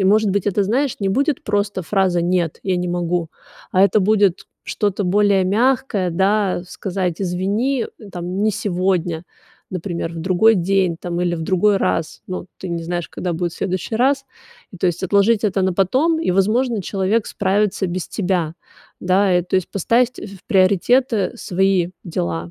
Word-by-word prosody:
И 190 - +1
может 210 +1 +4
быть, 200 0 -1
это, 200 0 +1
знаешь, 260 +6 0
не 195 - 0
будет 275 +7 0
просто 205 -2 -1
фраза 185 -1 +1
"нет, 175 -2 0
я 190 -2 +1
не 180 0 -2
могу", 175 -1 -1 0.4
а 185 - +3
это 210 +1 +3
будет 200 -2 +2 0.2
что-то 205 -1 -1
более 200 0 +3
мягкое, 210 -2 +1
да, 195 +2 +1
э, - - -12
сказать 180 -1 -3
извини, 205 +9 0 0.2
э, 210 -3 -12
там, 180 +3 -3
не 215 - +3
сегодня, 180 -4 -1 0.5
например, 170 -2 -4
в 165 - -7
другой 190 +5 +4
день, 185 -1 +1
там, 175 0 -3
или 175 -1 0
в 160 - -4
другой 195 +4 +2
раз. 165 - -1
Ну, 185 - -4
э, - - -22
ты 185 - -6
не 170 -1 -3
знаешь, 175 0 -3
когда 180 - -4
будет 170 0 -2
следующий 185 +3 -3
раз. 275 +3 +2 0.5
И - - -9
то 185 - 0
есть 175 +1 -1
отложить 200 +3 +3
это 195 -2 +1
на 185 -1 +1
потом, 265 - +2
и, 325 - 0
возможно, 215 +4 +1
человек 200 +4 0
справится 200 0 0
без 180 0 -4
тебя. 180 -5 -1 0.5
Да, 185 0 +3
и 175 - -1
то 180 - -6
есть 185 - -2
поставить, 235 +6 +1
э, - - -6
в 195 -2 -13
приоритеты, 215 +5 +3 0.2
э, - - -13
свои 185 -1 +1
дела. 85 - -3
190 Hz, 185 wpm, -20 LUFS, 175-210 Hz, 0.5 s, может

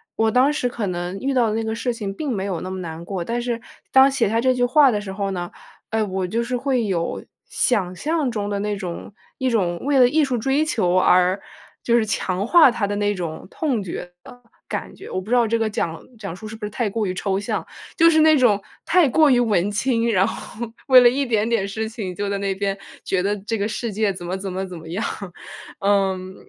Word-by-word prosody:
我 225 0 +2
当 255 +4 +4
时 295 -4 -1
可 230 -4 -3
能 175 +1 -3
遇 270 +4 -1
到 240 -4 +3
的 215 - -1
那 225 - -1
个 220 0 -2
事 240 +1 -2
情 205 -4 -5
并 285 +5 -3
没 195 -3 -2
有 185 -4 -2
那 185 - -5
么 190 0 -5
难 165 -2 -6
过， 185 -3 -3
但 235 +5 -2
是 240 -1 -2 0.3
当 265 +1 +7
写 255 -6 +1
下 225 +2 +1
这 255 +1 +3
句 250 -1 0
话 265 +2 +5
的 210 - 0
时 195 -2 -7
候 195 0 -2
呢， 175 -2 -4 0.4
哎， 220 0 0
我 190 -2 -2
就 230 +5 -1
是 250 +1 -2
会 255 -2 0
有 175 -4 -2 0.2
想 190 -7 0
象 305 - -1
中 205 -2 -3
的 205 - -1
那 210 0 -1
种 185 0 -6 0.2
一 260 -1 0
种 180 -7 0
为 280 -2 +3
了 250 - +7
艺 305 +3 +3
术 255 -3 0
追 270 +6 +1
求 185 - +1
而 185 +1 +4 0.4
就 235 - +2
是 230 -2 +3
强 190 -1 -1
化 325 +3 +7
它 230 -3 -1
的 205 - -2
那 205 0 +1
种 170 -3 -5
痛 265 -9 -1
觉 175 0 -6
的 245 - -14 0.3
感 - - -5
觉。 - - -11
我 185 - -3
不 195 - -11
知 245 - +3
道 240 -2 +4
这 230 +1 +1
个 225 -1 0
讲 165 -6 -3 0.2
讲 195 -5 -6
述， 215 - -11
是 220 - -8
不 215 - -6
是 - - -4
太 225 0 -1
过 215 +1 -1
于 185 - -2
抽 190 +1 -1
象。 200 - -3 0.3
就 330 -1 +6
是 315 -1 +4
那 310 0 +6
种 210 -6 +3 0.2
太 350 -3 +4
过 305 +3 +4
于 250 -2 +4
文 205 -5 +2
青， 230 +1 +1
然 190 -2 +3
后 235 +1 -6 0.2
为 260 -1 +9
了 245 - +7
一 275 +3 0
点 220 -3 +1
点 230 -4 +1
事 220 +2 -3
情 215 -5 -5
就 205 +1 -3
在 200 - -1
那 195 -1 -1
边 195 0 -2 0.3
觉 185 - 0
得 205 +1 0
这 225 +1 -2
个 205 0 -1
世 225 0 -4
界 210 -1 +1
怎 180 -2 -8
么 180 +2 -2
怎 195 0 -5
么 190 +1 -3
怎 180 - -8
么 160 0 -11
样。 190 +7 -3 0.8
嗯， 190 -2 0
215 Hz, 265 characters per minute, -22 LUFS, 190-245 Hz, 0.8 s, 为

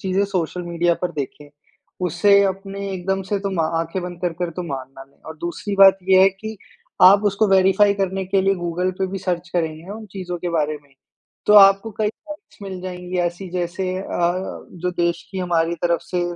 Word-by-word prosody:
चीज़ें 190 +1 0
social 180 -2 -2
media 170 0 +1
पर 180 - 0
देखें, 145 0 -6 0.6
उसे 200 +4 +4
अपने 195 +1 -4
एकदम 190 +1 -2
से 200 +2 -2
तो 200 0 -3
मा 165 - +2 0.2
आँखें 165 +3 -3
बंद 175 -1 -7
कर 175 -2 -1
कर 175 -1 -2
तो 180 +2 -5
मान 135 -5 -5
ना 135 - -9
लें। 140 - -31
और 160 0 -8
दूसरी 175 +5 -4
बात 195 0 +8
ये 190 -1 +6
है 195 - +7
कि 220 +3 -8 0.5
आप 200 +3 +8
उसको 205 +1 +2
वेरिफ़ाई 195 +1 +4
करने 195 -1 -2
के 190 +1 +1
लिए 195 0 +3
गूगल 175 +1 -2
पे 190 - 0
भी 195 +1 -5
सर्च 180 -1 -3
करेंगे 160 -2 -2
ना 200 - -6
उन 220 0 -9
चीज़ों 180 -2 -5
के 175 +1 -3
बारे 155 -2 -1
में। 140 -1 -27 0.5
तो - - +5
आपको 195 +2 +7
कई 215 - +2
पॉइंट्स 300 +7 -12
मिल 190 -2 -6
जाएँगी 180 0 -5
ऐसी 175 +2 -2
जैसे 185 +1 -2
अ, 175 -2 0 0.4
जो 180 0 -3
देश 170 -1 -1
की 190 - -5
हमारी 170 -2 0
तरफ 170 -1 +2
से 175 +1 -2
185 Hz, 210 wpm, -21 LUFS, 170-195 Hz, 0.6 s, बात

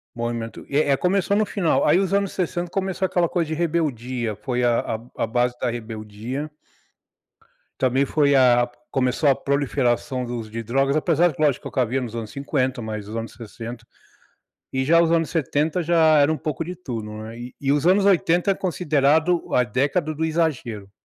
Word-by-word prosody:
Movimento, 115 -1 -4
é 145 0 +1
é 135 - +4
começou 195 +3 +1
no 215 - +3
final, 180 -6 +1
aí 150 +4 +4
os 195 0 0
anos 200 -1 +1
60 175 -1 -2
começou 190 -1 -1
aquela 175 -2 +1
coisa 170 -3 0
de 160 - -2
rebeldia, 130 -9 -1
foi 125 +3 -2
a 120 -1 +3 0.4
a - - -3
a - - -1
base 120 +2 0
da 120 - 0
rebeldia 115 +5 -6 1.3
também 130 +1 +2
foi 140 0 +2
a 120 -2 +5 0.2
começou 135 +2 +1
a 135 - +6
proliferação 130 -2 0
do 120 0 -4
uso 110 -2 -7
de 115 +1 -4
drogas, 135 +5 +1
apesar 170 +2 +3
que, 150 - -11
lógico, 145 -4 +1
o - - -13
que - - -4
havia 125 +2 0
nos 120 -2 -5
anos 110 -2 -5
50 135 -2 -2
mais 110 -2 -5
os 110 - -6
anos 115 0 -5
60 115 0 -9 0.9
e 130 0 0
já 165 +4 +5
os 165 -1 +2
anos 165 -1 +2
70 160 +2 0
já 160 -2 +4
era 145 +2 +4
um - - -3
pouco 155 +1 -3
de 180 - -6
tudo, 115 -11 -6
né, 115 +1 -9
e 125 +1 -9
e 135 0 +1
os 145 +1 +1
anos 195 +2 +4
80 180 -1 +3
é 195 - 0
considerado 160 -1 +1
a 125 - +4
década 140 - 0
do 160 +2 -1
exagero 140 -11 -2
140 Hz, 195 wpm, -23 LUFS, 120-165 Hz, 1.3 s, a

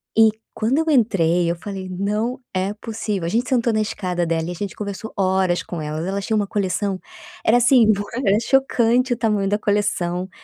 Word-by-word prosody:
E 225 0 +7 0.2
quando 230 +5 0
eu 320 - +1
entrei 180 - +3
eu 170 - 0
falei: 190 +1 -7
"Não 210 +6 -2
é 190 +1 0
possível" 210 -4 -4
a - - -1
gente 235 +7 0
sentou 240 -3 +2
na 215 - +2
escada 180 -4 -2
dela 165 0 -1
e - - -3
a - - -4
gente 200 +3 -5
conversou 205 +1 -6
horas 185 -2 +1
com 170 -3 -6
elas. 155 +2 -4
Elas 195 +1 -2
tinham 220 - 0
uma 205 - 0
coleção, 195 -1 -1 0.4
era 230 - +4
assim, 245 -1 +5 0.4
era 200 -3 +3
chocante 250 -1 +2
o - - -4
tamanho 210 -4 +1
da 205 - +2
coleção, 190 -4 -1
205 Hz, 195 wpm, -21 LUFS, 185-225 Hz, 0.4 s, E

